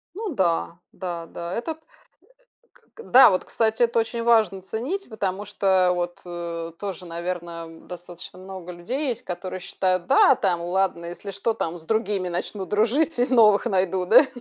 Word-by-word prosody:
Ну 410 -5 -4
да, 170 -2 0
да, 175 -3 -5
да, 170 +1 -7
этот 315 - -4
э - - -42 0.9
к 460 - -16
Да, 260 -3 +8
вот, 185 - 0
кстати, 220 +1 0
это 235 0 +1
очень 230 +1 -3
важно- 215 -5 +3
ценить. 255 - -4
Потому 200 -2 -3
что 190 -2 +2
вот, 175 0 -3
э, 170 -1 -5
тоже, 190 -3 -6
наверно, 170 0 -5
м, 165 0 -14
достаточно 175 0 -10
много 185 -1 -8
людей 255 - -3
есть, 235 - -3
которые 185 +1 -5
считают: 185 -1 -1
"Да, - - +6
там, 175 -4 0
ладно, 175 -1 0
если 175 +3 -7
что, 210 +3 -1
там 170 +1 -3
с 160 - -8
другими 210 -4 0
начну 185 +2 -4
дружить 240 +10 +1
и 245 - +3
новых 225 -4 +5
найду, 185 -3 0
да". 250 +8 +7
190 Hz, 170 wpm, -24 LUFS, 175-225 Hz, 0.9 s, Да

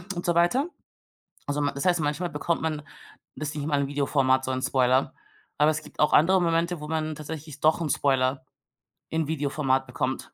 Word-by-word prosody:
und 175 - -4
so 175 - +2
weiter. 245 - +3 0.8
Also 145 +1 -1
ma 145 - +1
das 140 - -4
heißt, 175 -2 +3
manchmal 155 +4 -1
bekommt 160 +3 -1
man 155 -2 -2 0.5
das 150 0 -4
nicht 145 -1 -3
mal 145 -2 +1
im 140 - -1
Videoformat, 135 -2 +1
so 130 - -2
'n 130 0 -2
Spoiler. 130 0 +2 0.4
Aber 150 +2 +4
es 155 0 -4
gibt - - -16
auch 150 - +3
andere 185 +4 +5
Momente, 170 0 +1
wo 150 - -7
man 155 -1 -2
tatsächlich 150 -1 -8
doch 155 +2 +3
'n 155 - -1
Spoiler 130 -1 +1 0.7
in 160 -2 -1
Videoformat 140 -3 0
bekommt. 130 +1 -2
150 Hz, 190 wpm, -26 LUFS, 135-160 Hz, 0.8 s, andere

